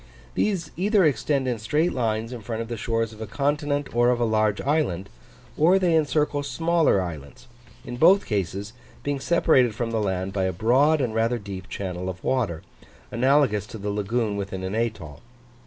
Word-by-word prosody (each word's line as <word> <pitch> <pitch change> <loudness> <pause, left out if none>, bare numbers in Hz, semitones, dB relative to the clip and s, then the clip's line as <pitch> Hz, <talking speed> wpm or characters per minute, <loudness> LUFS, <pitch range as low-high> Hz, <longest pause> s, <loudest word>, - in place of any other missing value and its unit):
These 180 - -1
either 200 +1 +3
extend 135 0 +1
in 120 -3 -1
straight 150 +11 0
lines 115 -1 -1
in 120 - -7
front 115 +1 -4
of 115 - -11
the 120 - -3
shores 115 0 -2
of 110 - -12
a 110 - -5
continent 145 +2 -1
or 120 0 +4
of 125 -1 +1
a 120 - +2
large 110 -2 +1
island, 125 - -1 0.5
or 175 +5 +4
they 180 -3 +2
encircle 150 -1 +1
smaller 165 - +2
islands; 80 -6 -7 0.4
in 120 - -6
both 185 +8 +5
cases, 100 0 -3 0.3
being 145 -1 -2
separated 130 -7 +3
from 115 0 -2
the 110 -1 0
land 95 -1 -2
by 95 -1 0
a 95 - -1
broad 135 - +3
and 120 -4 -1
rather 115 +2 +1
deep 100 -3 -8
channel 90 -1 -4
of 90 -1 -8
water, 110 -11 -1 0.5
analogous 130 -4 +2
to 115 - -8
the 105 0 -3
lagoon 105 +1 -1
within 95 -2 -5
an 95 +1 -3
atoll. 105 -10 -3
115 Hz, 185 wpm, -24 LUFS, 100-145 Hz, 0.5 s, both